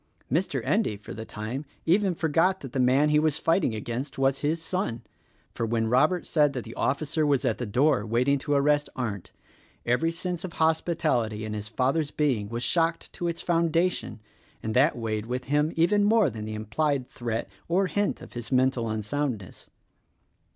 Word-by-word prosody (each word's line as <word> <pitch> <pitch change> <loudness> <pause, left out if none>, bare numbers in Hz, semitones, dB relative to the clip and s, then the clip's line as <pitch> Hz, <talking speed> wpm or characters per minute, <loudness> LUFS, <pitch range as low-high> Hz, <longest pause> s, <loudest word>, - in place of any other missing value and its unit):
Mr. 170 +8 0
Endy, 200 - +1
for 100 - -9
the 110 - -7
time, 110 +7 -5 0.2
even 185 +2 +3
forgot 165 +4 +2
that 135 -3 -8
the 135 - -1
man 130 +4 +4
he 150 0 +4
was 155 -1 +1
fighting 165 - +1
against 120 +6 -4
was 135 0 +2
his 155 +3 0
son; 165 - -2 0.5
for - - -3
when 115 0 0
Robert 150 +9 +2
said 150 -3 +2
that 125 -4 -4
the 115 - -9
officer 155 +3 0
was 140 -3 +2
at 115 -3 0
the 120 - -3
door 130 +2 +2
waiting 125 +6 +1
to 145 +1 -1
arrest 145 +1 +2
Arndt, 105 -8 -4 0.5
every 125 +8 +2
sense 175 0 -4
of 180 -3 -6
hospitality 155 -9 0
in 110 - -4
his 105 0 -4
father's 135 +7 0
being 130 -10 0
was 120 +1 -3
shocked 165 -1 0
to 175 - -3
its 170 -1 -3
foundation, 170 -7 +1 0.4
and 110 - -2
that 135 +4 +4
weighed 110 -1 -3
with 125 +1 -3
him 150 +3 +1
even 200 +5 +3
more 210 - +4
than 110 -1 -6
the 110 0 -5
implied 130 +5 -1
threat 115 -2 -3 0.2
or 185 +3 +2
hint 205 +2 -1
of - - -12
his 120 -1 -7
mental 130 -3 +2
unsoundness. 110 -1 -3
140 Hz, 180 wpm, -27 LUFS, 115-165 Hz, 0.5 s, man